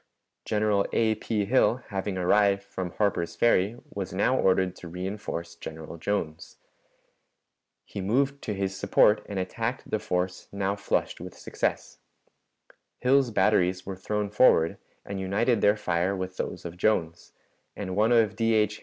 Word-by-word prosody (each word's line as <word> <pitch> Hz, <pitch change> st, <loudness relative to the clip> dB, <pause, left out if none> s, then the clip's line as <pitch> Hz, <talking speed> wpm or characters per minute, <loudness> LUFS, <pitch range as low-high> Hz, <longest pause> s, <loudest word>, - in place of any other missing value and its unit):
General 105 Hz, -2 st, +1 dB
A. 110 Hz, -1 st, +3 dB
P. 110 Hz, -1 st, -2 dB
Hill, 125 Hz, +2 st, +2 dB
having 95 Hz, -1 st, -3 dB
arrived 100 Hz, +2 st, +3 dB
from 95 Hz, -2 st, -5 dB
Harper's 85 Hz, -3 st, -1 dB
Ferry, 110 Hz, -2 st, +3 dB, 0.2 s
was 95 Hz, -2 st, -5 dB
now 115 Hz, +7 st, +2 dB
ordered 95 Hz, -4 st, +2 dB
to 85 Hz, -, -9 dB
reënforce 90 Hz, -2 st, -5 dB
General 80 Hz, +1 st, -8 dB
Jones. 80 Hz, -4 st, -3 dB, 1.3 s
He 100 Hz, -, -6 dB
moved 135 Hz, +8 st, +1 dB
to 105 Hz, -, -2 dB
his 95 Hz, 0 st, -2 dB
support 105 Hz, +2 st, +3 dB
and 100 Hz, -, -4 dB
attacked 115 Hz, +7 st, -3 dB
the 110 Hz, -, +1 dB
force 90 Hz, -1 st, -2 dB
now 100 Hz, 0 st, -1 dB
flushed 100 Hz, -, -2 dB
with -, -, -9 dB
success. -, -, -3 dB, 1.0 s
Hill's 130 Hz, 0 st, +4 dB
batteries 95 Hz, -3 st, +2 dB
were 95 Hz, -, -5 dB
thrown 105 Hz, +2 st, -3 dB
forward 95 Hz, -7 st, +4 dB, 0.3 s
and 100 Hz, -1 st, -5 dB
united 105 Hz, +4 st, +1 dB
their 105 Hz, +1 st, +4 dB
fire 90 Hz, 0 st, 0 dB
with 95 Hz, -1 st, -5 dB
those -, -, -4 dB
of 85 Hz, 0 st, -7 dB
Jones, 85 Hz, -4 st, 0 dB, 0.4 s
and 95 Hz, -2 st, -4 dB
one 110 Hz, +3 st, +3 dB
of 115 Hz, -3 st, +4 dB
D. 115 Hz, -1 st, +2 dB
H. 105 Hz, -1 st, +1 dB
100 Hz, 150 wpm, -27 LUFS, 90-110 Hz, 1.3 s, Hill's